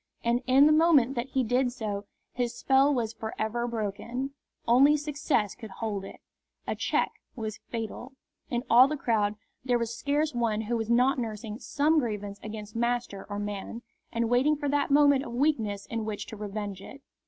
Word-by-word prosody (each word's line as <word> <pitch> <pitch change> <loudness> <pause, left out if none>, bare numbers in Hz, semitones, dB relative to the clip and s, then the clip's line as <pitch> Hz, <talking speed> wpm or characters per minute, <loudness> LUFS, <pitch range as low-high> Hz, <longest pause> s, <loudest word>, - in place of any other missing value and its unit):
And 235 +1 +2
in 265 +2 +6
the 305 - +6
moment 305 -5 +5
that 245 0 -3
he 265 -1 +1
did 245 +2 +1
so 210 -5 -4 0.3
his 240 -1 -2
spell 270 +1 +4
was 235 -5 -1
for 220 0 -6
ever 235 +2 -1
broken. 235 +4 -3 0.4
Only 275 +6 +6
success 290 - 0
could 220 -3 -10
hold 205 0 -4
it. 195 - -10 0.5
A - - -2
check - - 0 0.2
was 220 -3 -5
fatal. 235 +3 -5 0.4
In 240 0 -1
all 250 +3 +7
the 305 +1 -3
crowd 215 -5 +1 0.3
there 250 -2 +2
was 235 0 -3
scarce 290 +4 0
one 230 -3 0
who 225 +2 -2
was 225 -1 -2
not 250 +3 +3
nursing 220 -1 -5
some 305 +2 +2
grievance 205 -5 -4
against 215 0 -8
master 235 -4 -1
or 205 - -4
man, 205 +3 -5 0.3
and 230 0 0
waiting 255 +6 +3
for 290 0 -3
that 285 0 +1
moment 285 -1 +5
of 235 - -7
weakness 230 -7 0
in 230 -1 -3
which 215 -1 -4
to - - -9
revenge 205 -2 -5
it. 275 +7 -12
235 Hz, 185 wpm, -28 LUFS, 215-270 Hz, 0.5 s, all